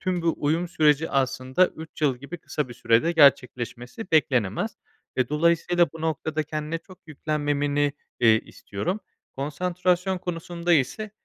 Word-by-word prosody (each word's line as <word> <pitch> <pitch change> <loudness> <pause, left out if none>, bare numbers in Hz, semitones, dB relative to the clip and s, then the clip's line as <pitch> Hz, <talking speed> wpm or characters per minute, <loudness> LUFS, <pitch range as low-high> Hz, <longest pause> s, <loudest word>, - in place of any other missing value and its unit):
Tüm 180 -2 -1
bu 165 -1 +2
uyum 160 +4 0
süreci, 155 -1 +2
aslında, 135 +4 +2
3 160 0 -11
yıl 140 -4 +3
gibi 140 +7 -8
kısa 150 -3 -3
bir 120 - -9
sürede 120 +10 +2
gerçekleşmesi 125 - +2
beklenemez 145 - +1 0.4
ve 130 - +1
dolayısıyla 170 +3 +3
bu 160 - -10
noktada 155 -1 -1
kendine 155 +1 -4
çok 185 +1 -16
yüklenmemeni, 145 -1 0 0.3
eee, 110 -2 +5
istiyorum. 175 - -5 0.4
Konsantrasyon 180 +5 0
konusunda 175 0 -2
ise, 170 - +1
155 Hz, 135 wpm, -25 LUFS, 140-175 Hz, 0.4 s, eee